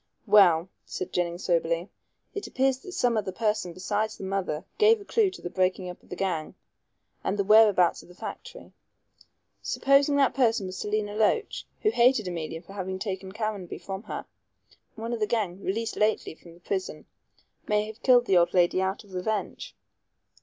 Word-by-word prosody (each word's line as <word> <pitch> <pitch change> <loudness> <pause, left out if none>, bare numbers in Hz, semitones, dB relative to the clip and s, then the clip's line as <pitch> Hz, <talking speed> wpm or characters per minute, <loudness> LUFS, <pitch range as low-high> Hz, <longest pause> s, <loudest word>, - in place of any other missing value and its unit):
"Well," 190 -6 +6 0.2
said 185 - -6
Jennings 175 0 -1
soberly, 170 0 0 0.5
"it 410 - -5
appears 265 0 +1
that 370 - -10
some 245 -7 +1
other 200 -3 -1
person 210 -3 -1
besides 205 +5 -2
the - - -9
mother 190 -4 -2
gave 440 +1 +6
a 405 - -12
clue 435 -2 +2
to 370 - -12
the 175 - -3
breaking 185 0 0
up 180 - -14
of - - -24
the - - -5
gang 175 -5 -2 0.7
and 200 - -1
the 200 - +1
whereabouts 210 -4 +5
of - - -18
the 180 - -15
factory. - - -9 0.9
Supposing 280 +1 +3
that 275 -2 +3
person 235 -5 +2
was 185 0 -6
Selina 210 +2 -2
Loach, 220 - 0 0.2
who 430 - +4
hated 240 - +3
Emilia 165 -1 -5
for 195 - -13
having 190 -1 -4
taken 190 -1 -5
Caranby 210 -4 -4
from 195 0 -6
her. - - -5 0.7
One 230 +2 -4
of 235 - -3
the 215 - +1
gang 200 -5 -1
released 225 +4 -2
lately 215 -4 0
from 170 +1 -16
prison 185 -4 -4 0.6
may 210 0 +2
have 220 +2 -10
killed 245 -2 +5
the 190 -5 +4
old 175 +1 +3
lady 180 +1 +3
out 190 +3 -2
of 200 -2 -17
revenge." 215 - -3
200 Hz, 180 wpm, -27 LUFS, 180-225 Hz, 0.9 s, Well